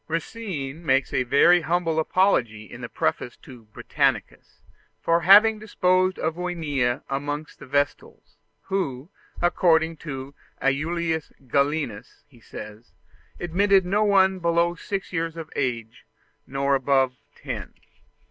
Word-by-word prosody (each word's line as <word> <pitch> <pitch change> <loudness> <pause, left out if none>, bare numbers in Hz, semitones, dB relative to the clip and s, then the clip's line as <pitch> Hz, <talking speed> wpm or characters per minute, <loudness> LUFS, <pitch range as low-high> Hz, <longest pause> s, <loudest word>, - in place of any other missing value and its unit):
Racine 165 -4 -5
makes 135 -3 +1
a - - +2
very 155 +8 +5
humble 165 0 0
apology 140 - +1
in 105 - -12
the - - -6
preface 120 - -2
to 125 -2 -12
the 115 - -22
"Britannicus" 105 - -2 0.4
for 165 +9 +2
having 210 +5 +7
disposed 185 -3 +1
of 160 +1 -2
Junia 150 -9 -1
amongst 145 +2 -4
the - - -11
Vestals, 145 +1 -2 0.3
who, 155 -5 -3 0.3
according 165 -2 +2
to 135 -3 -7 0.3
Aulus 160 +3 -1
Gellius, 140 -4 -2
he 125 -4 -21
says, 110 +1 -11 0.5
"admitted 190 +2 +2
no 205 +4 +1
one 190 -2 +3
below 170 0 +1
six 195 +3 -5
years 165 -1 -2
of 160 -1 -8
age 115 -5 -3 0.4
nor 140 +1 0
above 135 -1 +2 0.2
ten." - - -7
160 Hz, 125 wpm, -24 LUFS, 135-180 Hz, 0.5 s, having